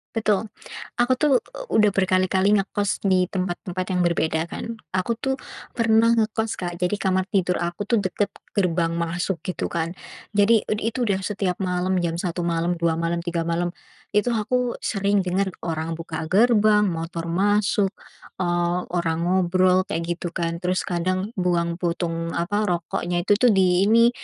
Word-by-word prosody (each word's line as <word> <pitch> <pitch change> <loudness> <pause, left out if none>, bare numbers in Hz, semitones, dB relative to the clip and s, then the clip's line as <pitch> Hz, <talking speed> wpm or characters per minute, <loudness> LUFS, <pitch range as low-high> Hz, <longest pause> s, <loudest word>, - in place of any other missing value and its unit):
Betul. 215 -1 +1 0.5
Aku 245 +2 +4
tuh, 275 -1 +3
eee, - - -10
udah 210 -2 +4
berkali-kali 185 +1 +2
ngekos 200 0 -1
di 185 -1 +3
tempat-tempat 185 0 -3
yang 180 - +2
berbeda, 160 -2 +1
kan. 230 - -5 0.2
Aku 185 +5 0
tuh, 265 0 -1 0.3
pernah 230 0 +3
ngekos, 220 0 0
Kak. 175 -1 -4
Jadi 180 +3 +1
kamar 190 -2 +1
tidur 185 -3 +1
aku 175 +4 -3
tuh, 235 - +3
dekat 200 +2 0 0.2
gerbang 170 -4 +1
masuk 170 +1 -2
gitu, 185 - -3
kan. 170 +1 -2 0.4
Jadi 210 +2 +4
ud 210 - -1
itu 235 +3 -1
udah 195 -1 +1
setiap 195 -3 -1
malam, 180 0 0
jam 170 0 -1
1 175 -1 -2
malam 170 +1 0
2 165 -1 0
malam 170 0 -1
3 170 -1 -2
malam. 175 +1 0 0.4
Itu 210 +4 +1
aku 240 +3 0
sering 200 0 +1
dengar 185 +1 -1
orang 165 -1 -3
buka 160 -1 -5
gerbang, 215 +1 +4
motor 165 0 -4
masuk, 200 +2 +2 0.5
eee, 175 0 +1
orang 165 -2 -1
ngobrol 185 +1 +3
kayak 170 +1 -2
gitu, 175 - -4
kan. 170 -1 -2
Terus 185 +1 0
kadang 185 +4 -1
buang 170 -2 0
puntung, 170 -1 -2
apa, 205 +5 0
rokoknya 175 0 -1
itu 205 +1 +3
tuh, 245 -1 +5
di 185 -1 +3
ini, 230 +2 +6
185 Hz, 160 wpm, -23 LUFS, 170-205 Hz, 0.5 s, ini